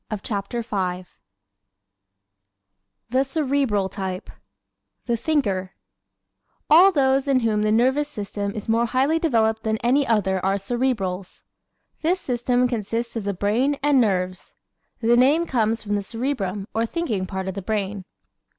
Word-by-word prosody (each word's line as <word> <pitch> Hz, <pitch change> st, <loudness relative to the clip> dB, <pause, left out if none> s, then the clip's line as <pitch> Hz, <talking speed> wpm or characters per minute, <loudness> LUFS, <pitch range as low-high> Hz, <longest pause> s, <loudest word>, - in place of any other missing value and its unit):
_ 215 Hz, -, -2 dB
CHAPTER 210 Hz, +3 st, -3 dB
V 185 Hz, -4 st, -3 dB, 2.0 s
The 260 Hz, +2 st, +3 dB
Cerebral 270 Hz, -8 st, 0 dB
Type 190 Hz, -2 st, -5 dB, 0.7 s
"The 235 Hz, -, +1 dB
Thinker" 200 Hz, -9 st, -1 dB, 1.0 s
All 360 Hz, +5 st, +8 dB
those 270 Hz, -3 st, +2 dB
in 265 Hz, -2 st, +3 dB
whom 215 Hz, -2 st, +1 dB
the 215 Hz, 0 st, +1 dB
nervous 260 Hz, +6 st, +2 dB
system 205 Hz, -4 st, -4 dB
is 210 Hz, -, -6 dB
more 230 Hz, +1 st, +2 dB
highly 270 Hz, +7 st, +2 dB
developed 225 Hz, -8 st, +1 dB
than 220 Hz, 0 st, -1 dB
any 265 Hz, +4 st, +3 dB
other 190 Hz, -4 st, +1 dB
are 195 Hz, +1 st, +2 dB
Cerebrals. 200 Hz, -4 st, -2 dB, 0.6 s
This 350 Hz, +4 st, +1 dB
system 250 Hz, -2 st, +1 dB
consists 230 Hz, 0 st, -3 dB
of 225 Hz, -3 st, -3 dB
the 200 Hz, -, -1 dB
brain 235 Hz, +9 st, +1 dB
and 285 Hz, -3 st, +4 dB
nerves. 185 Hz, -4 st, -1 dB, 0.5 s
The 235 Hz, +1 st, +4 dB
name 285 Hz, +7 st, +4 dB
comes 225 Hz, -5 st, 0 dB
from 205 Hz, -1 st, -3 dB
the 205 Hz, -, +1 dB
cerebrum 210 Hz, -3 st, -3 dB
or 225 Hz, +1 st, 0 dB
thinking 225 Hz, -, -2 dB
part 190 Hz, 0 st, -4 dB
of 190 Hz, -, -2 dB
the 200 Hz, -, -5 dB
brain. 200 Hz, -1 st, -3 dB
225 Hz, 140 wpm, -23 LUFS, 200-265 Hz, 2.0 s, All